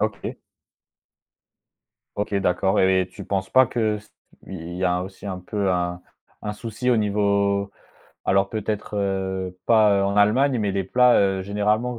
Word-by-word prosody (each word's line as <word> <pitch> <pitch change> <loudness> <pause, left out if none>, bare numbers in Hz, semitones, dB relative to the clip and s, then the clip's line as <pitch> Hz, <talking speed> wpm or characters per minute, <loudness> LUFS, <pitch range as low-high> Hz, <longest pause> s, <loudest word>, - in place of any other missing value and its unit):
OK. - - -3 1.8
OK, 105 0 -2
d'accord 95 +2 +1
et 95 -1 +3
tu - - -10
penses 95 -1 -2
pas 130 -1 +6
que 110 -3 -1
ce 105 - -18 0.4
il 85 -2 -7
y 95 - -1
a 90 0 +1
aussi 95 +2 -10
un 95 -2 -4
peu 95 +1 -2
un 90 0 -2 0.4
un 105 - -3
souci 115 +3 -3
au 120 - +4
niveau 100 -1 +1 0.5
alors 95 0 +2
peut-être, 105 -1 -3
heu, 95 -2 -2
pas, 110 -3 +5
heu, 100 - +1
en 100 +1 -1
Allemagne 125 +6 +3
mais 100 -2 0
les 95 -1 0
plats, 125 +4 +4
heu, 95 -1 +1
généralement 105 +4 0
100 Hz, 160 wpm, -23 LUFS, 95-105 Hz, 1.8 s, pas